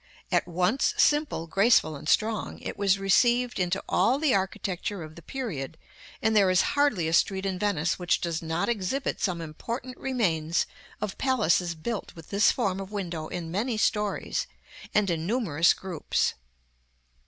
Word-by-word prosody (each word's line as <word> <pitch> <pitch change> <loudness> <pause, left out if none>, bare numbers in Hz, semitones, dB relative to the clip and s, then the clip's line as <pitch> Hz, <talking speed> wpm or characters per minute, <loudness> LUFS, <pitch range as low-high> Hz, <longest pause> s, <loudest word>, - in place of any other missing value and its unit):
At - - +2
once 180 +9 +1
simple, 295 - +2
graceful, 195 -3 +3
and 150 +2 -6
strong, 220 +2 +1
it - - -5
was 200 -1 +2
received 240 +5 +2
into 180 +1 0
all 255 - +3
the 295 -2 +2
architecture 190 -1 -2
of 155 0 -10
the 170 - -12
period, 165 - -5 0.5
and 220 0 +2
there 200 -3 +5
is 185 0 +4
hardly 285 - +2
a 160 - -1
street 190 +2 +2
in 190 -2 -2
Venice 175 -5 0
which 175 -1 +1
does 170 -2 -2
not 165 +1 -1
exhibit 235 +4 -2
some 175 -4 -1
important 235 - -6
remains 170 -11 0 0.4
of 210 -2 -4
palaces 185 -10 +2
built 210 +7 -5
with 165 -1 -13
this 200 +1 +4
form 195 -6 -1
of 195 +1 -7
window 175 -6 -4
in 170 -2 -5
many 220 +5 -1
stories, 210 -1 0 0.4
and 205 -3 +2
in 165 0 -2
numerous 180 - +3
groups. 185 -5 -1
190 Hz, 160 wpm, -27 LUFS, 170-225 Hz, 0.5 s, there